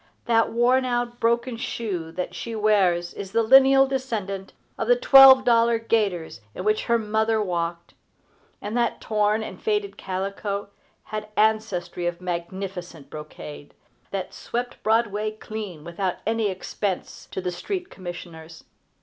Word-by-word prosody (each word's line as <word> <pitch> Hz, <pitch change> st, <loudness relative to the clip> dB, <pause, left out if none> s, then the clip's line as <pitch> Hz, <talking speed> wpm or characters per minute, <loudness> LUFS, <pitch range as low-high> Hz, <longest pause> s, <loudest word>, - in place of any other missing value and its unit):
That 230 Hz, -1 st, +3 dB
worn 245 Hz, +3 st, +3 dB
out, 240 Hz, -1 st, -2 dB
broken 235 Hz, +1 st, +1 dB
shoe 185 Hz, -9 st, -4 dB
that 180 Hz, +1 st, -4 dB
she 230 Hz, -1 st, -5 dB
wears 190 Hz, -5 st, +2 dB
is 195 Hz, 0 st, -8 dB
the 230 Hz, 0 st, +3 dB
lineal 270 Hz, +3 st, +7 dB
descendant 220 Hz, -8 st, -3 dB, 0.2 s
of -, -, -3 dB
the -, -, +6 dB
twelve 270 Hz, -, +8 dB
dollar 235 Hz, -1 st, +4 dB
gaiters 200 Hz, -, -1 dB
in -, -, -5 dB
which 215 Hz, +1 st, +1 dB
her 235 Hz, -, +3 dB
mother 220 Hz, 0 st, +1 dB
walked; 170 Hz, -3 st, -3 dB, 0.7 s
and 210 Hz, +2 st, -4 dB
that 240 Hz, -1 st, 0 dB
torn 215 Hz, 0 st, +1 dB
and -, -, -8 dB
faded 415 Hz, -2 st, -1 dB
calico 200 Hz, +2 st, -4 dB, 0.3 s
had 215 Hz, 0 st, -5 dB
ancestry 215 Hz, -5 st, +1 dB
of 175 Hz, 0 st, -3 dB
magnificent 180 Hz, -2 st, -6 dB
brocade, 150 Hz, -1 st, -9 dB, 0.3 s
that 190 Hz, -2 st, -4 dB
swept 245 Hz, +1 st, -5 dB
Broadway 215 Hz, -1 st, +1 dB
clean 215 Hz, -7 st, -7 dB
without 175 Hz, +2 st, -2 dB
any 225 Hz, -1 st, +1 dB
expense 190 Hz, +1 st, -4 dB
to -, -, -5 dB
the 180 Hz, -1 st, -2 dB
street 360 Hz, -, -5 dB
commissioners. 170 Hz, -3 st, -9 dB
215 Hz, 140 wpm, -24 LUFS, 180-235 Hz, 0.7 s, twelve